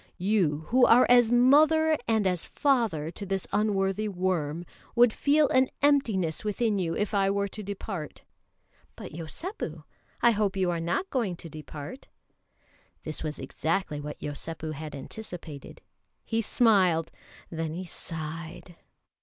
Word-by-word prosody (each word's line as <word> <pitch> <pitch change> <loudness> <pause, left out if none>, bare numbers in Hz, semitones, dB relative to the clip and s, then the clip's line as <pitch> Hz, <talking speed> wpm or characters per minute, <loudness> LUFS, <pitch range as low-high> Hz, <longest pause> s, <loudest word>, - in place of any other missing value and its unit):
You, 180 -6 +1
who 250 +2 +5
are 245 +2 +7
as 245 -2 +6
mother 310 +6 +5
and 220 -3 +2
as 180 -3 0
father 225 - +1
to 200 - -7
this 195 -1 -2
unworthy 205 0 +1
worm, 175 -4 -1 0.3
would 240 -2 +5
feel 295 +1 +3
an 260 0 +3
emptiness 220 - +2
within 210 0 0
you 165 -3 -1
if 210 0 -2
I 195 -1 +3
were 200 0 0
to 215 - -7
depart." 195 -5 -6 0.7
"But, - - -9
Yosépu, 250 - -6 0.4
I 235 - +5
hope 205 -3 0
you 185 -2 +1
are 170 - -2
not 175 - -2
going 225 -9 0
to 170 - -10
depart." 155 - -9 1.0
This 155 - -5
was 150 -2 -4
exactly 155 +3 -2
what 150 0 -7
Yosépu 155 +2 -5
had 150 0 -7
anticipated. 165 -1 -9 0.4
He 225 0 0
smiled, 185 -8 +3 0.4
then 160 -1 -3
he 185 +2 -5
sighed. 165 +1 -7
190 Hz, 140 wpm, -28 LUFS, 160-225 Hz, 1.0 s, are